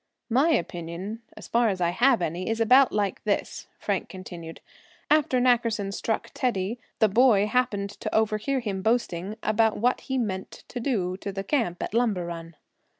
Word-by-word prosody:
"My 270 Hz, +8 st, +4 dB
opinion, 175 Hz, -, -2 dB, 0.2 s
as -, -, -9 dB
far 235 Hz, -1 st, +3 dB
as 190 Hz, -2 st, -2 dB
I 170 Hz, -1 st, +2 dB
have 240 Hz, 0 st, +3 dB
any, 175 Hz, +5 st, -2 dB
is 225 Hz, 0 st, -1 dB
about 250 Hz, +4 st, +6 dB
like 205 Hz, -3 st, -1 dB
this," 210 Hz, -2 st, -2 dB
Frank -, -, -2 dB
continued. 175 Hz, -3 st, -9 dB, 0.5 s
"After 295 Hz, -4 st, +4 dB
Nackerson 230 Hz, -5 st, +2 dB
struck 220 Hz, +2 st, -2 dB
Teddy 230 Hz, -2 st, -1 dB, 0.2 s
the 220 Hz, -, +4 dB
boy 215 Hz, -1 st, +4 dB
happened 210 Hz, -3 st, 0 dB
to -, -, -3 dB
overhear 220 Hz, +5 st, +1 dB
him 200 Hz, -4 st, -3 dB
boasting 210 Hz, -3 st, 0 dB
about 220 Hz, +1 st, +2 dB
what 245 Hz, +3 st, +1 dB
he 265 Hz, -, -3 dB
meant 190 Hz, -6 st, -4 dB
to 245 Hz, -, -5 dB
do 195 Hz, -8 st, -1 dB
to 200 Hz, -, -5 dB
the 195 Hz, 0 st, -4 dB
camp 195 Hz, -, -1 dB
at -, -, -5 dB
Lumber 220 Hz, -7 st, +1 dB
Run." 165 Hz, -1 st, -7 dB
215 Hz, 170 wpm, -26 LUFS, 190-240 Hz, 0.5 s, about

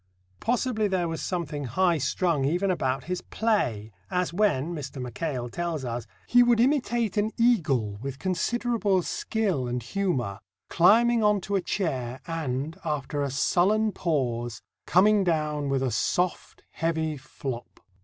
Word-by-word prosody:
Possibly 235 Hz, -2 st, 0 dB
there 185 Hz, -3 st, 0 dB
was 165 Hz, -1 st, -4 dB
something 155 Hz, -6 st, -3 dB
high 170 Hz, +6 st, +2 dB
strung 165 Hz, 0 st, +1 dB
even 175 Hz, +7 st, +1 dB
about 135 Hz, -6 st, -1 dB
his 180 Hz, +2 st, -3 dB
play, 125 Hz, -, -1 dB, 0.2 s
as 180 Hz, -1 st, -1 dB
when, 175 Hz, -6 st, +1 dB
Mr. 140 Hz, -3 st, -6 dB
Mackail 125 Hz, +1 st, -3 dB
tells 165 Hz, +1 st, -3 dB
us, 120 Hz, -1 st, -4 dB, 0.2 s
"he 245 Hz, -, +5 dB
would 240 Hz, -1 st, +4 dB
imitate 240 Hz, -5 st, +1 dB
an 210 Hz, +1 st, +2 dB
eagle 145 Hz, -, +2 dB
with 135 Hz, 0 st, -5 dB
considerable 205 Hz, -, 0 dB
skill 190 Hz, -, -1 dB
and 120 Hz, 0 st, -3 dB
humour, 125 Hz, -, -1 dB, 0.3 s
climbing 230 Hz, +6 st, +5 dB
on 210 Hz, -1 st, +4 dB
to 200 Hz, +2 st, -2 dB
a 195 Hz, -, +2 dB
chair 130 Hz, -10 st, -2 dB
and, 155 Hz, -2 st, -3 dB
after 145 Hz, -1 st, -2 dB
a 140 Hz, -, 0 dB
sullen 200 Hz, +11 st, +2 dB
pause, 120 Hz, -, -2 dB, 0.2 s
coming 200 Hz, +4 st, +5 dB
down 150 Hz, -4 st, 0 dB
with 135 Hz, -1 st, +1 dB
a 130 Hz, -, 0 dB
soft, 180 Hz, -, -1 dB
heavy 160 Hz, -1 st, -1 dB
flop." 130 Hz, -2 st, -7 dB
165 Hz, 145 wpm, -27 LUFS, 135-200 Hz, 0.3 s, he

